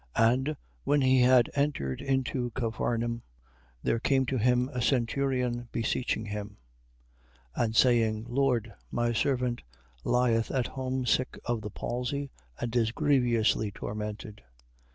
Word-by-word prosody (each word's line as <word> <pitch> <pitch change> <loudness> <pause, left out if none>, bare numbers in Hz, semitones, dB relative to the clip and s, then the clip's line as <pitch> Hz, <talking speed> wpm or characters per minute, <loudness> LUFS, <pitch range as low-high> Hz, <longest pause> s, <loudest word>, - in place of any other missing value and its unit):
8:5. 115 +1 +5
And 135 +4 -2 0.3
when 145 0 +2
he 130 -1 +4
had 125 -1 +5
entered 140 - -1
into 130 -2 0
Capharnaum, 115 -1 -1 0.6
there 115 - +1
came 130 +2 +2
to 130 +1 -1
him 125 +2 +3
a 125 -3 -3
centurion, 125 -1 0
beseeching 115 -1 -1
him, 105 -1 -6 1.0
8:6. - - +1
And 110 -1 -1
saying, 110 -2 +3
Lord, 120 -4 +1 0.2
my 120 - 0
servant 125 -1 0 0.4
lieth 120 -2 +2
at 130 -3 0
home 130 -1 -3
sick 130 +2 +1
of 120 -2 -1
the 105 - -5
palsy, 125 +6 -3 0.3
and 120 0 -3
is 115 -2 +2
grievously 120 -7 +2
tormented. 105 0 -6
120 Hz, 130 wpm, -29 LUFS, 115-130 Hz, 1.0 s, 8:5